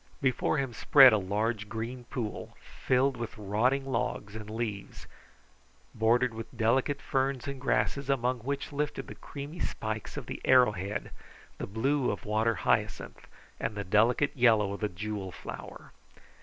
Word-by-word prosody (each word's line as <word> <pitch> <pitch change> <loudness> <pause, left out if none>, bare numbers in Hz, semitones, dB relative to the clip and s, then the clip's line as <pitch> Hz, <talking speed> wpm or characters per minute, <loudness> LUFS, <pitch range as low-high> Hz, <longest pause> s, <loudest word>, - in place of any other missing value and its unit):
Before 130 +3 +1
him 135 -4 -2
spread 135 0 +7
a 105 - +3
large, 105 +2 -1
green 120 +3 -5
pool, 115 -4 -5
filled 130 +1 0
with 120 +3 -6
rotting 110 +7 +1
logs 115 -5 -2
and 105 -1 -7
leaves, 110 -3 -5 0.9
bordered 120 +2 +2
with 115 0 -8
delicate 130 +5 +2
ferns 135 0 -1
and 140 -2 -5
grasses 140 0 0
among 125 -2 +1
which 140 +5 -4
lifted 145 +1 -2
the - - -8
creamy 145 +4 -8
spikes 110 -6 -4
of - - -5
the - - -6
arrow 125 -3 +6
head, 100 +1 -4 0.5
the - - -4
blue 130 +6 +1
of - - -4
water 110 +2 +1
hyacinth, - - -1 0.3
and 110 - -2
the 100 - -3
delicate 115 +8 +3
yellow 110 -6 +4
of 100 - -6
the 105 - -1
jewel 100 0 -5
flower. - - -9
115 Hz, 155 wpm, -29 LUFS, 105-135 Hz, 0.9 s, spread